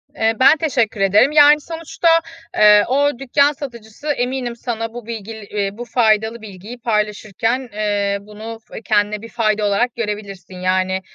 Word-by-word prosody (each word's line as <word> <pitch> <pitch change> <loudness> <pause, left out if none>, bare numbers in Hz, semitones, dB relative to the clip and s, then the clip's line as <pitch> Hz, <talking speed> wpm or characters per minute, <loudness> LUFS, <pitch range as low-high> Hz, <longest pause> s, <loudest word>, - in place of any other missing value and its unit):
Eee, 225 0 +1
ben 290 +4 +6
teşekkür 240 -9 -1
ederim. 205 +8 +4
Yani, 295 0 +6
sonuçta, 330 +1 -4 0.5
eee, 210 -1 +6
o 280 0 +1
dükkân 280 +2 +2
satıcısı 245 -2 -10
eminim 250 -3 -2
sana 225 -1 -5
bu 240 -2 -8
bilgil 220 -2 -7 0.3
bu 240 - -6
faydalı 220 -1 +1
bilgiyi 210 +3 -10
paylaşırken, 220 +2 -2
ııı, 200 -1 -1
bunu 220 +2 -9 0.3
kendine 210 -1 +1
bir 230 - -10
fayda 215 -2 0
olarak 205 +4 0
görebilirsin, 205 -4 -6
yani, 185 +1 0
225 Hz, 140 wpm, -19 LUFS, 210-250 Hz, 0.5 s, ben